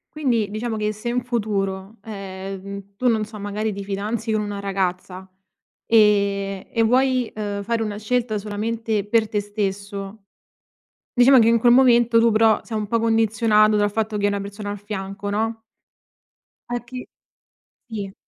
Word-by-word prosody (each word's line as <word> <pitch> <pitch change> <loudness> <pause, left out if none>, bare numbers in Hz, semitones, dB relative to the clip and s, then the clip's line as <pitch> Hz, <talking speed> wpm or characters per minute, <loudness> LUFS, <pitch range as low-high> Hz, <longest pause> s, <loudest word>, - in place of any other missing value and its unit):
Quindi, 235 -9 0
diciamo 220 +1 -3
che 210 0 -1
se 215 +3 -5
in 245 0 -1
futuro, 205 -4 -2
ehm, 195 -1 -7
tu 250 - 0
non 220 -3 +2
so, 215 0 -10
magari 205 +2 -3
ti 200 0 -6
fidanzi 210 +3 -3
con 215 -1 +1
una 205 -1 -4
ragazza, 190 -1 -3 0.6
ehm, 200 -3 +3
e 230 - +1
vuoi, 255 +1 +2
uhm, 205 -1 -3
fare 225 +2 -1
una 210 -1 -4
scelta 225 0 -1
solamente 215 +1 -2
per 220 0 +2
te 210 - 0
stesso, 200 0 -4 0.9
diciamo 255 +1 +6
che 225 - +5
in 230 0 +4
quel 240 +1 +5
momento 240 -2 +5
tu 230 0 +4
però 220 0 +4
sei 225 - -5
un 210 - -3
po' 230 +2 0
condizionato 220 -1 +3
dal 205 0 +2
fatto 215 0 -2
che 205 - +1
è - - +3
una 200 0 -1
persona 200 +1 -6
al 205 - -5
fianco, 200 0 -6
no? 225 +2 -2 1.1
A 240 0 -1
chi 250 +1 -8 0.8
sì. 205 -4 -6
215 Hz, 165 wpm, -22 LUFS, 200-230 Hz, 1.1 s, diciamo